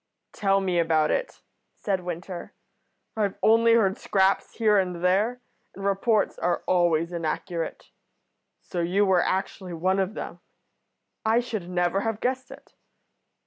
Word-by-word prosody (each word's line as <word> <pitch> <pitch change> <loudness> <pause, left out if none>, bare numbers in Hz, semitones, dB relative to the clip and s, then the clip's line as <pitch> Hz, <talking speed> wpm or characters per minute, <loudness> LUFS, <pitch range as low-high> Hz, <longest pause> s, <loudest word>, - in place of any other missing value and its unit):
"Tell 195 -1 +2
me 180 -2 0
about 160 -2 +2
it," - - -3 0.3
said 195 -2 -1
Winter. 175 0 -6 0.6
"I've 205 -3 -1
only 230 +1 +5
heard 200 -4 +3
scraps 195 0 +1
here 215 -3 +4
and 180 -2 -2
there, 210 +7 +2 0.3
and 195 - -7
reports 200 +2 +1
are 175 +1 0
always 170 -2 +2
inaccurate. 170 +1 -4 0.7
So 175 - -5
you 185 +4 +2
were 185 -2 +4
actually 190 -1 -2
one 185 +4 +1
of 195 +3 -1
them. - - -6 0.8
I 225 +2 +3
should 220 -7 -4
never 180 +1 +1
have 225 -1 -2
guessed 255 +1 -2
it." 275 +1 -14
190 Hz, 140 wpm, -26 LUFS, 175-215 Hz, 0.8 s, only